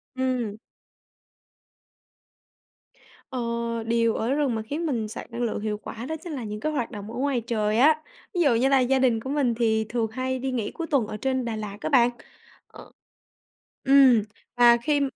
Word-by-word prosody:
Ừm. 250 -5 -1 2.7
Ờ, 255 - -4 0.4
điều 230 0 +1
ở 235 +4 0
rừng 280 -5 +1
mà 220 - -2
khiến 295 +10 -4
mình 235 -8 -1
sạc 215 - -8
năng 235 +1 -5
lượng 235 - -1
hiệu 210 -1 -2
quả 230 +3 -8
đó 315 - -3
chính 345 -4 -6
là 260 -4 -4
những 210 -1 -5
cái 310 +7 -1
hoạt 255 -5 -2
động 210 0 -7
ở - - -7
ngoài 265 -2 0
trời 215 -2 -1
á. 310 +4 +5 0.3
Ví 355 - 0
dụ 275 -7 +4
như 255 +4 +2
là 275 -1 +5
gia 260 +1 +2
đình 245 -4 +3
của 260 - -7
mình 275 -4 +1
thì 220 -2 +1
thường 230 -2 0
hay 260 +2 -2
đi 265 +1 -2
nghỉ 235 -5 -2
cuối 330 - -5
tuần 275 -8 +1
ở 210 - -5
trên 260 +2 -1
Đà 230 -2 -3
Lạt 210 -1 -6
á - - -2
bạn. 245 -5 +5 0.6
Ờ - - -14 0.9
ừm, 265 -5 +6 0.3
và 240 -1 +6
khi 295 0 +2
245 Hz, 195 wpm, -25 LUFS, 225-270 Hz, 2.7 s, ừm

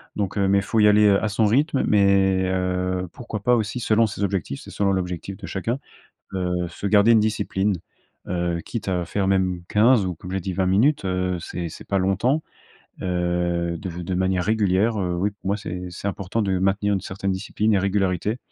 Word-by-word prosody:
donc, 100 0 -2
heu, 100 -1 +2
mais 100 +1 +4
il - - 0
faut 110 +3 -1
y 105 - +6
aller, 105 0 +5
heu, 100 +1 +3
à - - +2
son 110 +2 +1
rythme, 135 +6 +2
mais, 100 -2 +3
heu, 90 0 -1
pourquoi 120 -3 -6
pas 125 +4 +3
aussi, 110 +1 -2
selon 115 -1 +3
ses 100 -1 -4
objectifs. 95 -8 -2
C'est - - -12
selon 100 -1 +1
l'objectif 90 0 -3
de - - -8
chacun, 115 +7 -2 0.5
heu, 90 -1 -1
se 90 +4 -8
garder 105 +3 +5
une 110 - +5
discipline, 105 -2 0 0.5
heu, 85 -1 -1
quitte 110 -5 -4
à 90 -2 -1
faire 95 +2 -1
même 95 -2 +1
15 110 0 +4
ou, 90 -2 -3
comme 90 +3 -9
j'ai 95 - -1
dit, 95 - -3
20 95 +1 0
minutes, 110 +9 +2
heu, 90 -1 -1
c'est 85 0 -5
c'est - - -11
pas 100 - +1
longtemps, 100 - +1 0.6
heu, 85 -1 -1
de 95 - -5
de 90 - -3
manière 95 0 +1
régulière, 105 +1 +1
heu, 90 -1 -1
oui, 100 +4 0
pour 100 -1 -10
moi, 100 +1 +1
c'est 90 -3 -6
c'est 90 +3 -6
important 100 +3 -2
de 95 -2 0
maintenir 100 +2 +1
une 95 - -1
certaine 95 +1 -3
discipline 105 +3 0
et 100 - +3
régularité 95 +2 0
95 Hz, 210 wpm, -23 LUFS, 90-105 Hz, 0.6 s, y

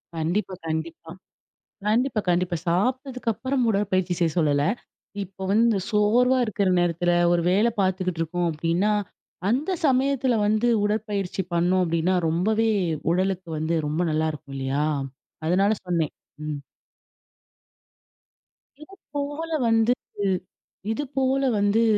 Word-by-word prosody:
கண்டிப்பா, 175 +5 -1
கண்டிப்பா. 160 +1 -4 0.8
கண்டிப்பா, 235 +1 +2
கண்டிப்பா, 175 0 +1
சாப்பிட்டதுக்கப்புறம் 255 +4 0
உடற்பயிற்சி 185 -3 +1
செய்ய 165 -2 +2
சொல்லல. 145 -3 +2 0.6
இப்ப 190 0 -8
வந்து 225 0 +4
சோர்வா 235 +5 +3
இருக்கற 205 -2 0
நேரத்துல 175 0 +1 0.2
ஒரு 175 -1 +3
வேல 210 +5 +4
பார்த்துக்கிட்டிருக்கோம். 175 -2 0
அப்பிடீன்னா, 170 +6 0 0.6
அந்த 285 +10 0 0.2
சமயத்துல 265 -1 +2
வந்து, 215 +3 +2 0.2
உடற்பயிற்சி 205 -3 -1
பண்ணோம். 180 +2 +2
அப்பிடீன்னா 170 +3 +1
ரொம்பவே 215 +7 +1 0.4
உடலுக்கு 185 -1 -1
வந்து 160 +2 0
ரொம்ப 155 +4 -1
நல்லாயிருக்கும், 155 -3 -2
இல்லையா! 135 +3 0 0.6
அதனால 195 +4 +3
சொன்னேன். 170 -4 0 0.3
ம். 150 -2 -3 2.2
இது 390 - -16 0.2
போல 290 +3 -3 0.2
வந்துட்டு 225 -2 +1 0.7
இது 290 +6 -2
போல 270 +1 +2 0.2
வந்து, 205 +3 +3
190 Hz, 105 wpm, -24 LUFS, 170-225 Hz, 2.2 s, வந்து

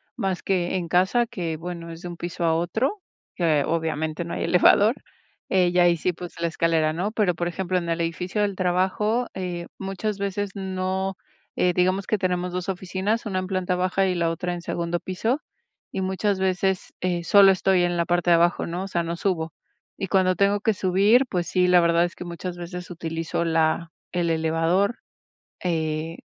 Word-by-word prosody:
más 190 -2 -2
que 185 -2 0
en 175 -2 -2
casa, 190 +8 +3
que, 170 -6 -4
bueno, 170 0 -6
es 165 0 -9
de - - -5
un 175 - -8
piso 175 +1 -4
a 165 - +3
otro, 225 - -1 0.3
que 155 -5 +2
obviamente 160 0 -2
no 170 - -4
hay - - -2
elevador. 205 +4 +5 0.6
Y 180 -2 +3
ahí 175 -1 +5
sí, 180 +3 0
pues, 175 +1 -8
la 170 - +2
escalera, 165 -1 +1
¿no? 185 +6 -2
Pero, 210 -5 +1
por 175 +1 -2
ejemplo, 185 +1 -1
en 170 -1 -5
el 165 0 0
edificio 180 +5 -2
del 200 -1 -1
trabajo, 190 +6 +1
eh, 175 -2 -4
muchas 195 +2 -3
veces 200 0 -2
no. 190 0 -2 0.4
Digamos 180 +2 +1
que 215 - +1
tenemos 180 -1 -1
2 180 +1 -3
oficinas, 190 +4 -2
una 190 -3 -1
en 185 - -4
planta 185 -1 -1
baja 185 +2 +1
y 185 - 0
la 170 -1 +1
otra 180 +2 -3
en 175 - -5
segundo 170 0 -2
piso, 225 +10 -1 0.5
y - - -3
muchas 190 +1 0
veces, 190 0 0
eh, 175 -1 -1
solo 200 +1 +7
estoy 190 -1 +2
en 175 0 0
la 170 - +1
parte 175 0 +1
de - - +8
abajo, 170 +1 +2
¿no? 175 +2 -3
O 195 - -5
sea, 170 -3 -1
no 170 +1 -3
subo. 165 -4 -1 0.5
Y 195 - -3
cuando 185 -1 +3
tengo 200 +1 +2
que 220 0 +2
subir, 200 +7 +3
pues 175 -3 -1
sí, 180 +1 +2
la 180 -1 +6
verdad 170 0 +3
es 175 - -6
que - - -7
muchas 175 +1 -5
veces 180 +1 -7
utilizo 165 0 -3
la 165 0 +1 0.2
el 175 -2 0
elevador, 165 +6 +1 0.7
eh, 160 -1 -1
180 Hz, 195 wpm, -24 LUFS, 170-190 Hz, 0.7 s, de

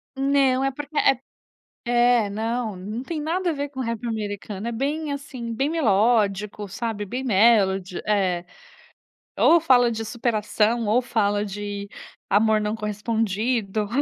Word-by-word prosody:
Não. 270 -1 +2
É 270 - +1
porque 295 +2 -7
é 270 -2 +4 0.7
É, 240 -3 +4
não, 225 0 -2
não 210 +6 -5
tem 310 +3 -4
nada 345 +4 -1
a - - 0
ver 285 0 -4
com 265 - -7
o - - 0
rap 230 0 -4
americano. 205 -1 -4
É - - -3
bem 290 +6 -2
assim, 255 -5 -6
bem 275 +6 0
melódico, 210 -6 +1
sabe, 210 0 -4
bem 250 +6 -4
melody, 195 -5 +3
é. 185 -4 +1 0.9
Ou 340 0 +5
fala 245 -6 +4
de 225 -1 -3
superação 225 0 0
ou 235 +4 +3
fala 205 -3 0
de 205 0 -5 0.4
amor 215 +1 +3
não 210 +1 -2
correspondido. 215 0 -1
225 Hz, 145 wpm, -24 LUFS, 205-255 Hz, 0.9 s, Ou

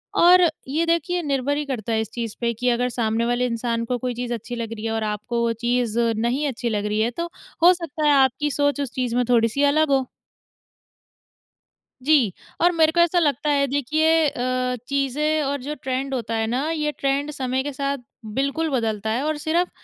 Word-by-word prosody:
और 360 +1 +7 0.3
ये 310 +5 0
देखिए 335 +1 0
निर्भर 280 -1 0
ही 300 - -2
करता 240 -5 -4
है 220 - +2
इस 220 - -5
चीज़ 230 -3 -4
पे 235 0 +1
कि 250 +3 -1
अगर 245 +1 +1
सामने 230 -1 0
वाले 245 +1 +1
इंसान 230 -1 -2
को 250 +1 -1
कोई 250 +1 -3
चीज़ 245 0 -3
अच्छी 235 +1 -5
लग 230 -1 -4
रही 220 0 -7
है 225 - -1
और 225 0 -1
आपको 215 +3 -2
वो 230 0 +1
चीज़ 240 -2 0
नहीं 235 +5 +1
अच्छी 245 -3 -3
लग 210 -2 -1
रही 210 +1 -1
है 230 +2 +1
तो 340 - -3 0.3
हो 355 +2 +8
सकता 325 -3 -4
है - - +6
आपकी 270 +2 +2
सोच 285 0 +1
उस 270 - -3
चीज़ 250 -2 -2
में 250 - +3
थोड़ी-सी 235 +3 +3
अलग 305 +2 +3
हो। 265 -2 +2 2.0
जी, 270 - +3 0.3
और 350 +1 +5
मेरे 320 -2 +3
को 345 - 0
ऐसा 345 +1 +4
लगता 300 -2 +1
है 280 -1 +3
देखिए 310 +4 +2
अ, 255 -1 -1
चीज़ें 285 +3 0
और 280 0 -2
जो 295 +4 -4
ट्रेंड 265 +1 -2
होता 230 -3 -2
है 225 0 0
ना, 260 +7 -1
ये 300 -2 -1
ट्रेंड 280 +1 -1
समय 260 -2 -2
के 290 - -3
साथ 275 +1 -2 0.4
बिल्कुल 280 +6 0
बदलता 220 -5 -1
है। 235 +5 0
और 310 0 -1
सिर्फ़ 340 +3 0
260 Hz, 210 wpm, -23 LUFS, 235-295 Hz, 2.0 s, हो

